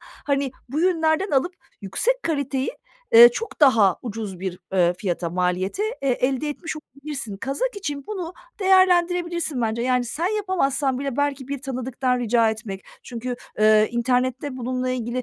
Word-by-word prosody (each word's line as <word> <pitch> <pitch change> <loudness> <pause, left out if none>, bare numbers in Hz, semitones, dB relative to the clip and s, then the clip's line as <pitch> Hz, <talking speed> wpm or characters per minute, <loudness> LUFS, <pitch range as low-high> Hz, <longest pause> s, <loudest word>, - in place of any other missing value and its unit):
hani 280 -1 -3 0.2
bu 295 +5 -2
yünlerden 330 +1 +2
alıp 320 +6 +1 0.3
yüksek 475 - 0
kaliteyi, 280 -4 -1 0.4
eee, 235 +1 +11
çok 390 - -6
daha 225 - +5
ucuz 210 -6 -6
bir, 185 -1 -4
ııı, 175 -2 +3
fiyata, 175 -3 -3
maliyete, 180 - -1 0.2
eee, 275 - 0
elde 265 +4 0
etmiş 315 +2 -5
olabilirsin. 280 -7 -7
Kazak 415 - -2
için 295 -6 -5
bunu 365 -5 -5 0.3
değerlendirebilirsin 350 -5 +3
bence. 225 +1 -1
Yani 250 0 +1
sen 310 +8 -2
yapamazsan 275 -9 0
bile 275 -2 -3
belki 280 -2 -1
bir 280 -1 -4
tanıdıktan 255 -1 -1
rica 230 -1 +3
etmek, 215 -3 -6 0.2
çünkü, 245 0 -5 0.2
eee, 215 0 +5
internette 255 +3 0
bununla 255 +1 -2
ilgili 250 0 -2
260 Hz, 145 wpm, -23 LUFS, 230-305 Hz, 0.4 s, eee